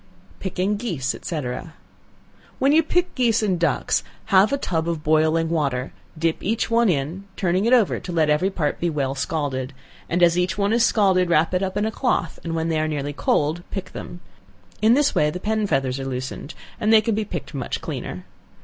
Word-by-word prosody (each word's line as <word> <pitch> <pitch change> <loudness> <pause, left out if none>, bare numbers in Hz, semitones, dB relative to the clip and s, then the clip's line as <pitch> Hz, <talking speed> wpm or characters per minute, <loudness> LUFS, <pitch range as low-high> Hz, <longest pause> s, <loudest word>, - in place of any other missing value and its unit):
Picking 190 +2 -1
Geese, 170 - -2
&c. 160 -3 -3 1.2
When 270 +2 +3
you 315 +2 +6
pick 355 +3 0
geese 235 -4 +2
and 185 -5 +1
ducks, 165 -6 +1 0.2
have 195 +4 +4
a 280 - +1
tub 165 -9 -1
of 165 -3 -3
boiling 155 +1 +3
water; 140 -5 -1 0.2
dip 165 0 0
each 225 +3 -1
one 230 -1 +4
in, 165 +5 -2
turning 185 +1 +1
it 235 - +2
over 235 -6 +3
to 180 - -7
let 160 -3 +2
every 150 +6 +2
part 160 -7 -2
be 175 - 0
well 140 -4 -1
scalded, 135 -2 -2 0.4
and 175 +1 +2
as 170 0 +5
each 180 +2 0
one 200 +1 +1
is 235 0 +3
scalded, 190 -6 +3
wrap 165 +1 +3
it 180 - +1
up 190 0 -2
in 205 - +1
a 220 - -1
cloth, 220 - -1
and 165 -1 -3
when 165 0 -1
they 160 -1 +1
are 155 - 0
nearly 145 -2 -3
cold, 155 +3 0
pick 195 - -5
them. 175 0 -8 0.6
In 220 +3 +5
this 285 0 +3
way 150 - +3
the 180 - -5
pen 215 +1 0
feathers 135 -4 0
are 135 - -4
loosened, 130 +3 -5 0.2
and 215 -1 +2
they 220 -1 +7
can 225 +1 0
be 215 +1 0
picked 210 - -6
much - - -3
cleaner. - - -6
175 Hz, 205 wpm, -23 LUFS, 155-210 Hz, 1.2 s, they